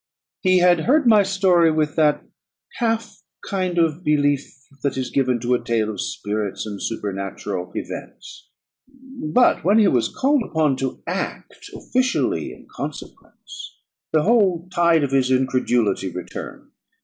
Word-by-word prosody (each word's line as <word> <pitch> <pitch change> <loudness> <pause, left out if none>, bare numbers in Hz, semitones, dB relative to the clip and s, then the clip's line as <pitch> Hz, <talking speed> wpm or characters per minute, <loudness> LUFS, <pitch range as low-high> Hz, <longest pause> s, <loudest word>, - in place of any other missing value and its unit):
He 185 -1 +3
had 175 -1 +4
heard 295 +3 +4
my 220 -3 +6
story 190 -4 +3
with 155 -1 0
that 150 -2 +2 0.5
half 225 -2 -2 0.2
kind 185 -3 -2
of 165 0 +1
belief 145 -2 +1 0.3
that 140 -2 -1
is 130 -1 -3
given 130 -3 +1
to 120 +1 0
a 125 - 0
tale 110 -2 0
of 100 - -5
spirits 105 -1 -3
and 105 -2 -7
supernatural 100 -3 -4
events; - - -8 0.5
but 255 - +1
when 200 +6 +4
he 215 -2 +5
was 125 -9 +2
called 280 +1 +1
upon 155 - 0
to 130 -1 -4
act 180 +3 -5
officially 255 0 -1
in - - -14
consequence, - - -9 0.3
the 155 -1 +2
whole 190 -6 +2
tide 170 -3 +3
of 140 - -1
his 135 -2 +2
incredulity 125 -6 +1
returned. 90 0 -8
155 Hz, 140 wpm, -21 LUFS, 125-195 Hz, 0.5 s, my